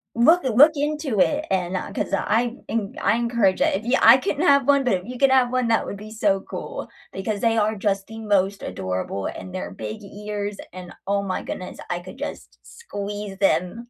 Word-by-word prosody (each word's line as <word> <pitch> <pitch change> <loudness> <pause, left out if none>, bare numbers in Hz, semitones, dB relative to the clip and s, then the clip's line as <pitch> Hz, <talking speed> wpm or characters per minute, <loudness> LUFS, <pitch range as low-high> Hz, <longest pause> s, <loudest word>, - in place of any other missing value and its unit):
Look 320 +9 +5
uh, - - +2
look 290 +8 +7
into 295 -6 -1
it 300 +9 +2
and, 185 0 0
uh, - - -4
'cause - - -3
I 235 +5 +1
en 215 -3 -2
I 215 - +2
encourage 235 -5 +1
it. - - +3
If 205 - -3
y 245 +3 +2
I 235 +3 +9
couldn't 290 +6 -1
have 280 -2 +5
1 280 -1 +4
but 245 - +2
if 180 0 -2
you 250 +1 -7
could 275 -1 +5
have 255 -2 +4
1 255 -2 +1
that 225 - +2
would 200 - -6
be 215 +1 -10
so 205 -3 +1
cool, - - -7 0.2
because 200 +2 -3
they 230 -1 +2
are 215 0 +2
just 195 -1 -1
the 225 0 -9
most 200 -2 0
adorable 95 +1 -3
and 185 - -8
their 185 - -4
big 215 0 -7
ears 205 0 -5 0.2
and 180 -1 -9
oh 200 0 +1
my 185 -1 -3
goodness, 185 - -6
I 175 0 -1
could 185 +8 -11
just 290 - -7
squeeze 205 - -7
them. 195 +6 0
210 Hz, 215 wpm, -23 LUFS, 195-245 Hz, 0.2 s, I